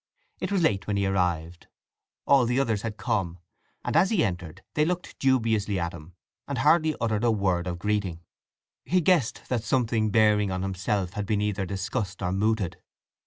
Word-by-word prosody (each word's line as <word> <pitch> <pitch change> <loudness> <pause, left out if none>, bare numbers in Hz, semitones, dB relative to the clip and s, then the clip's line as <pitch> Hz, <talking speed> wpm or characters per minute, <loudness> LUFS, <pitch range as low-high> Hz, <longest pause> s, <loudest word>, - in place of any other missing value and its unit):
It - - -3
was 195 -4 +2
late 100 -11 +1
when 100 -1 0
he 100 - +1
arrived: 90 -3 -1 0.6
all 135 -4 +5
the 125 +2 +1
others 115 -7 0
had 110 -1 -5
come, 90 -3 -1 0.5
and - - -2
as 190 - +5
he 200 -8 +2
entered 90 -1 -5
they 150 - +2
looked 180 +2 -3
dubiously 110 -7 +1
at 85 -1 -2
him, 80 +3 -12 0.3
and 140 - -3
hardly 155 +5 +3
uttered 110 -1 0
a 120 - +4
word 95 -5 +1
of 90 -1 -3
greeting. 100 -3 -1 0.6
He 185 - +2
guessed 170 -8 +2
that 120 -3 0
something 115 -3 +1
bearing 105 -2 +3
on 95 0 -2
himself 95 0 -2
had 105 -2 -4
been 105 -1 +1
either 105 -2 -1
discussed 100 0 -3
or 90 - 0
mooted. 100 -3 0
105 Hz, 180 wpm, -26 LUFS, 95-120 Hz, 0.6 s, all